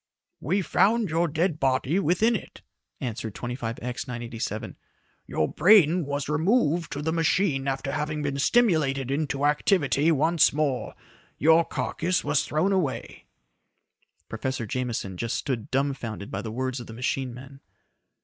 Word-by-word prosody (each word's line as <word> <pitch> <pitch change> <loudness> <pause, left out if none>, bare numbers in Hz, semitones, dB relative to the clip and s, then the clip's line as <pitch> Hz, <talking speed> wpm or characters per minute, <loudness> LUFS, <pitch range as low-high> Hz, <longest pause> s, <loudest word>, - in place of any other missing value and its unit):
"We 185 +8 0
found 215 0 +2
your 170 +2 +2
dead 160 +1 0
body 135 +6 +1
within 200 +7 +2
it," - - -8 0.4
answered 110 -4 -5
25X 120 +1 -5
987. 115 -2 -5 0.5
"Your 75 - 0
brain 175 -5 +5
was 145 0 -2
removed 165 - +1
to 145 - -4
the 160 - 0
machine 160 -3 +1
after 135 0 -2
having 150 +1 -2
been 140 -1 -2
stimulated 145 - +2
into 140 -1 -1
activity 150 0 +2
once 160 +2 +3
more. 145 -4 -1 0.4
Your 160 +2 +5
carcass 175 +2 -1
was 145 0 +1
thrown 170 +6 +1
away." 140 -11 -2 1.0
Professor 130 +2 -3
Jameson 110 -5 -3
just 115 +4 -2
stood 120 -6 -3
dumfounded 130 -6 -2
by 95 - -3
the 110 - -6
words 130 +2 -2
of 120 - -9
the 110 - -9
machine 130 +2 -2
man. 135 +3 -11
140 Hz, 140 wpm, -26 LUFS, 125-165 Hz, 1.0 s, brain